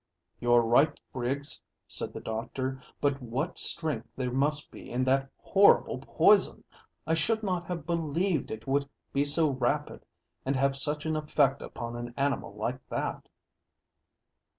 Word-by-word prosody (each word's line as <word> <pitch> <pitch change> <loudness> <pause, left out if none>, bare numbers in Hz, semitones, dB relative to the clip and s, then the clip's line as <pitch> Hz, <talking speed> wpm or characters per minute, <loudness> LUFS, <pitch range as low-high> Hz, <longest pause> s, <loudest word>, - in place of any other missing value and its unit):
"You're 120 0 +4
right, 135 +7 +3
Griggs," 135 +3 -2 0.3
said - - -4
the - - -7
doctor. 130 +4 -4 0.2
"But 140 -1 +1
what 125 +1 -3
strength 155 -9 +1
there 125 -1 -2
must 145 +3 +1
be - - -11
in 125 +1 0
that 135 +1 +2
horrible - - +4
poison! - - +3 0.4
I 160 - +1
should 220 +7 +1
not 180 -4 -1
have 170 -5 -4
believed 170 0 0
it 110 0 -6
would 140 +1 0 0.2
be 140 +1 +2
so 150 +1 +3
rapid 130 -2 -1 0.4
and 135 +1 0
have 135 +1 +2
such 150 +3 +1
an 160 0 0
effect 145 -3 +2
upon 120 0 -6
an 120 0 -6
animal 140 -7 -1
like 120 +5 -2
that." - - -3
140 Hz, 150 wpm, -29 LUFS, 125-150 Hz, 0.4 s, You're